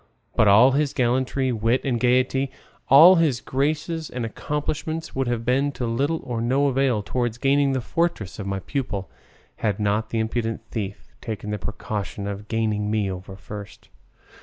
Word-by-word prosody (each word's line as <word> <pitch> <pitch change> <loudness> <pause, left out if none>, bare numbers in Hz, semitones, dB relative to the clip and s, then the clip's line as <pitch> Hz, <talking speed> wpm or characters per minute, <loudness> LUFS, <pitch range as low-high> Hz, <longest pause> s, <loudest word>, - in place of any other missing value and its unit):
But 110 - +4
all 110 +7 +7
his 145 +1 +1
gallantry, 130 +1 +1
wit, 115 +2 +1
and 125 -4 0
gaiety, 130 +2 +2 0.4
all 165 +7 +9
his 150 -7 +2
graces 155 +4 -2
and 125 -2 -4
accomplishments, 150 +6 -3
would 135 -1 -1
have 120 -1 -2
been 130 +3 +2
of 145 - -6
little 135 +7 0
or 120 -2 -3
no 130 +5 +2
avail 130 -5 +1
towards 120 0 -2
gaining 140 +1 +2
the 130 - 0
fortress 165 - -2
of 100 - -4
my 100 0 -2
pupil, 105 -6 -4 0.5
had 105 -2 -1
not 105 +1 0
the 115 - -2
impudent 115 0 -1
thief 100 -3 -5
taken 105 -2 -5
the 105 - -2
precaution 105 -1 -4
of 100 +1 -5
gaining 110 -2 0
me 105 -3 0
over 95 +1 -8
first. 100 +1 -10
120 Hz, 165 wpm, -24 LUFS, 105-135 Hz, 0.5 s, all